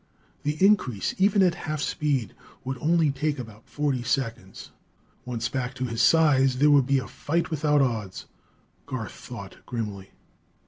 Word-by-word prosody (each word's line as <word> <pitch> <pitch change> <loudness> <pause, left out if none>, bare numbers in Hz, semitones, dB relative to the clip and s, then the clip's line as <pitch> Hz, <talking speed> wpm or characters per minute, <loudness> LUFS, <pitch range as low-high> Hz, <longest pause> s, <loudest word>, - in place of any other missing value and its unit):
The 150 +1 -2
increase, 130 - +2
even 200 0 +4
at 180 -2 +4
half 155 -4 -4
speed, 140 -6 -1 0.3
would 130 0 -4
only 160 0 +2
take 145 +2 -1
about 115 -3 -10
forty 145 -4 -1
seconds. 115 -6 -3 0.5
Once 120 -2 -2
back 125 0 -3
to 130 0 -2
his 115 -1 -2
size 135 -4 +4
there 145 +3 +5
would 140 -3 +5
be 140 0 +3
a 130 - -3
fight 170 +3 -2
without 150 -2 +2
odds, 110 -7 -3 0.6
Garth 125 -8 -4
thought 100 -6 -10
grimly. 105 -5 -5
130 Hz, 150 wpm, -26 LUFS, 115-150 Hz, 0.6 s, there